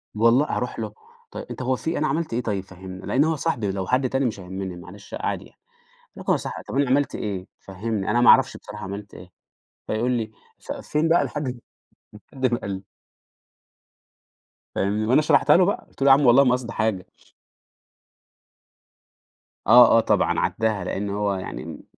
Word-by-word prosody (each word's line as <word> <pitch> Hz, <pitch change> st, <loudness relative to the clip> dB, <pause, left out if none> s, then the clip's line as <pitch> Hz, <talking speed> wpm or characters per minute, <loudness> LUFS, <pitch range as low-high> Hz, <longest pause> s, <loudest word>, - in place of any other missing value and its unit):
والل 115 Hz, +5 st, +4 dB
أروح -, -, -3 dB
له؟ -, -, -4 dB, 0.4 s
طيب -, -, -7 dB
أنت -, -, -6 dB
هو 130 Hz, +1 st, 0 dB
في 160 Hz, +6 st, -3 dB
أنا 155 Hz, -, +1 dB
عملت 160 Hz, -5 st, -2 dB
إيه 120 Hz, -, 0 dB
طيب 100 Hz, -5 st, -2 dB
فهّمني، 95 Hz, 0 st, -10 dB
لأن 135 Hz, -, +2 dB
هو 160 Hz, 0 st, +1 dB
صاحبي 125 Hz, -11 st, -1 dB
لو 95 Hz, -1 st, -4 dB
حد 130 Hz, 0 st, +1 dB
تاني 135 Hz, 0 st, 0 dB
مش 110 Hz, -5 st, -2 dB
هيهمني 95 Hz, 0 st, -6 dB
معلش 90 Hz, +3 st, -13 dB
عادي -, -, -3 dB
يعني، -, -, -22 dB, 0.6 s
لكن -, -, 0 dB
هو -, -, +3 dB
صاحبي، -, -, -6 dB
طب -, -, -6 dB
أنا 140 Hz, -2 st, +2 dB
عملت 140 Hz, +2 st, +2 dB
إيه؟ 95 Hz, -2 st, -4 dB
فهّمني 100 Hz, +1 st, -4 dB
أنا 120 Hz, +3 st, +2 dB
ما 120 Hz, -, +7 dB
أعرفش 135 Hz, 0 st, +5 dB
بصراحة 105 Hz, -1 st, -9 dB
عملت 100 Hz, +1 st, -7 dB
إيه، 90 Hz, -, -12 dB, 0.6 s
فيقول 115 Hz, +4 st, 0 dB
لي 115 Hz, -3 st, -2 dB, 0.3 s
ف -, -, -8 dB
فين 155 Hz, +2 st, -1 dB
بقى 170 Hz, -, +4 dB
لحد 130 Hz, -5 st, -4 dB, 0.7 s
لحد 130 Hz, -1 st, -2 dB
ما 120 Hz, -, 0 dB
قال 100 Hz, -, -5 dB
لي. 95 Hz, 0 st, -5 dB, 1.9 s
فاهمني، 105 Hz, +2 st, 0 dB
وأنا 130 Hz, +6 st, +4 dB
شرحتها 155 Hz, -, +4 dB
له 180 Hz, -, +5 dB
بقى 200 Hz, -, -2 dB
قُلت -, -, -20 dB
له: 135 Hz, -, +3 dB
"ياعم 135 Hz, +1 st, +6 dB
والله 125 Hz, +3 st, +7 dB
ما 125 Hz, -, +3 dB
قصدي 125 Hz, -2 st, -3 dB
حاجة.". 110 Hz, -4 st, -1 dB, 2.6 s
آه 120 Hz, 0 st, +8 dB
آه -, -, +7 dB
طبعًا 115 Hz, -, +1 dB
عدّاها، 110 Hz, -4 st, 0 dB
لأنه 100 Hz, +2 st, -3 dB
هو 105 Hz, -1 st, 0 dB
يعني 80 Hz, -4 st, -7 dB
115 Hz, 180 wpm, -23 LUFS, 100-135 Hz, 2.6 s, آه